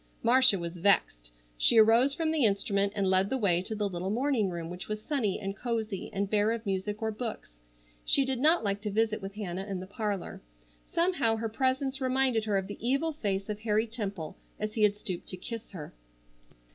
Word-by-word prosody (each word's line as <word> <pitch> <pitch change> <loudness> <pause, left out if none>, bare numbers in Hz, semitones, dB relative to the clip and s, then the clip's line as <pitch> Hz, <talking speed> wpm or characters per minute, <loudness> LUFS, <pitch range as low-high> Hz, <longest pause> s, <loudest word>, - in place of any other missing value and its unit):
Marcia 255 -3 +6
was 170 -1 -5
vexed. 165 - +2 0.3
She 230 - +5
arose 230 +5 +6
from 320 0 0
the 315 -4 +1
instrument 200 -1 +2
and 200 -1 0
led 190 +1 +3
the 265 - 0
way 180 -7 +2
to 220 +4 -4
the 210 -1 0
little 185 0 -4
morning 235 -2 +1
room 170 -2 -5
which 180 +1 -7
was 215 0 -3
sunny 220 -5 -1
and 195 0 -4
cosy, 220 -3 -3
and 200 +1 -1
bare 210 +2 +2
of 230 0 -5
music 205 +2 -2
or 220 - 0
books. 215 - -6 0.4
She 275 - +3
did 265 -2 -2
not 315 +3 +4
like 200 -1 -1
to 210 - -3
visit 220 +1 0
with 195 +1 -7
Hannah 195 -2 -4
in 195 -2 -3
the 185 - -7
parlor. 205 -1 -4 0.5
Somehow 335 -10 +2
her 225 0 -3
presence 265 +3 -1
reminded 255 -3 +2
her 205 -2 +1
of 190 - -1
the 205 - -8
evil 275 +7 0
face 200 -8 -2
of 210 -1 -4
Harry 215 0 +1
Temple 200 -8 -5 0.2
as 215 0 -3
he 220 - -2
had 210 -1 +4
stooped 185 -4 -6
to 185 - -4
kiss 225 +4 -7
her. 165 -6 -8
210 Hz, 210 wpm, -29 LUFS, 195-240 Hz, 0.5 s, Marcia